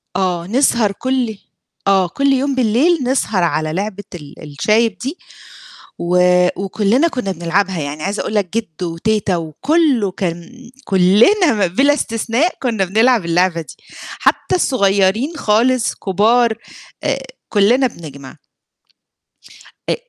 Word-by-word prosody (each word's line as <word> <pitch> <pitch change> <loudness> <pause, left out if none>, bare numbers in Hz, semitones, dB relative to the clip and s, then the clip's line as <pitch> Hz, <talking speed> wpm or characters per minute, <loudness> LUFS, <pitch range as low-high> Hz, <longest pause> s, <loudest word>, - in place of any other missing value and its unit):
آه، 175 -2 -1
نسهر 235 -2 +2
كل 250 -1 -2 0.5
آه، 190 -2 +3
كل 275 +10 +1
يوم 270 +1 0
بالليل 260 +8 +2
نسهر 245 -7 0
على 155 -1 -1
لعبة 200 +2 -4
ال 150 -4 -11
الشايب 210 +9 0
دي 275 +8 -5 0.8
و 175 +1 0 0.5
وكُلّنا 215 - +1
كُنّا 250 -11 -3
بنلعبها، 180 +1 -1
يعني 145 +1 -5
عايزة 200 +2 -2
أقول 215 - -4
لك 200 -4 0
جِدّو 175 -5 -4
وتيتة 205 +1 -1
وكُلّه 245 - 0
كان 185 +8 -6
كُلّنا 210 - +3
بِلا 270 +12 +2
استثناء 235 +5 -1
كُنّا 225 -7 0
بنلعب 220 +2 +2
اللعبة 170 0 +1
دي. 160 - -12 0.4
حتّى - - +1
الصغيرين 215 - +1
خالص، 235 +1 +1
كبار 220 +4 +1 0.5
آآ - - -1 0.3
كُلّنا 235 +6 +3
بنجمع. 140 - -11 1.5
أ - - +2
210 Hz, 120 wpm, -17 LUFS, 180-250 Hz, 1.5 s, آه